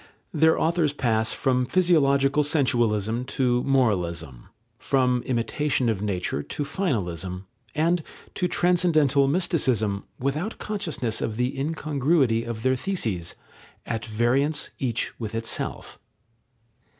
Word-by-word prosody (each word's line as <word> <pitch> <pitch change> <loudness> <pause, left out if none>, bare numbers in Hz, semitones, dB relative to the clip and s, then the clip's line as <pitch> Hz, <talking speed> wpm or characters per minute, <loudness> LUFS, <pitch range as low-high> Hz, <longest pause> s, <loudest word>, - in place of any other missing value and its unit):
Their 160 +1 +4
authors 160 -3 +1
pass 110 -5 +1
from 125 -2 +1
physiological 145 -6 +3
sensualism 120 -6 +1
to 125 -2 +2
moralism, 85 - 0 0.3
from 125 -2 +2
imitation 130 +1 0
of 105 -4 -1
nature 90 -8 -2
to 145 - -4
finalism, 95 - -2 0.3
and 165 +3 +2 0.3
to 180 - 0
transcendental 160 -7 +3
mysticism, 130 - 0
without 150 - -2
consciousness 165 - -3
of 110 - -2
the 125 +2 0
incongruity 140 -4 +1
of 115 -1 -5
their 130 0 +3
theses, 115 - -3 0.5
at 115 -1 -3
variance 125 +7 0
each 120 -4 -2
with 110 -2 -5
itself. 115 0 -4
130 Hz, 110 wpm, -25 LUFS, 110-150 Hz, 0.5 s, Their